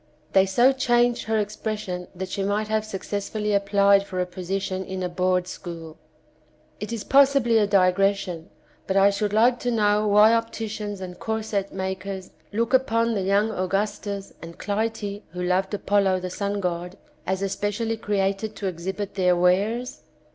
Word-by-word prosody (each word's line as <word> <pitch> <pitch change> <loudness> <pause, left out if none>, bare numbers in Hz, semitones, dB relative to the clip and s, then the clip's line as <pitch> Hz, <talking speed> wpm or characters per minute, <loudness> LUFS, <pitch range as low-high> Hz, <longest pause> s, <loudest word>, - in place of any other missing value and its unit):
They 190 0 +5
so 240 +7 +4
changed 240 -2 +2
her 220 0 0
ex 210 0 -2
pression 190 -5 -4
that 185 +1 -5
she 200 - -3
might 205 +2 -1
have 215 0 +1
successfully 210 +1 -3
applied 200 0 +4
for 185 -2 -5
a 180 - +1
position 185 +1 -3
in 190 0 -5
a 180 - -1
board 180 0 0
school. 165 -4 -8 0.8
It 210 +2 -5
is 230 -3 -3
possibly 270 -4 +4
a 205 - +2
digression, 190 -2 +1 0.4
but 190 - +1
I 195 +1 +6
should 205 +1 -1
like 240 +3 +3
to 245 - -2
know 210 -2 +2
why 210 +2 +6
opticians 220 -3 -3
and 180 -1 -7
corset 215 -3 -2
makers 190 0 -5 0.2
look 230 +4 -1
upon 230 -3 +2
the 200 - -1
young 200 +3 +2
Augustus 200 +1 -2
and 165 0 -10
Clytie, 205 -1 -2
who 180 0 -4
loved 185 +2 +1
Apollo 200 -2 +1
the 185 0 -5
sun 200 +1 -2
god, 180 0 -3 0.3
as 190 +1 -1
especially 205 +3 -1
created 205 0 -1
to 200 - -6
exhibit 190 +3 -4
their 180 -2 +3
wares 200 +8 +1
200 Hz, 160 wpm, -24 LUFS, 190-215 Hz, 0.8 s, I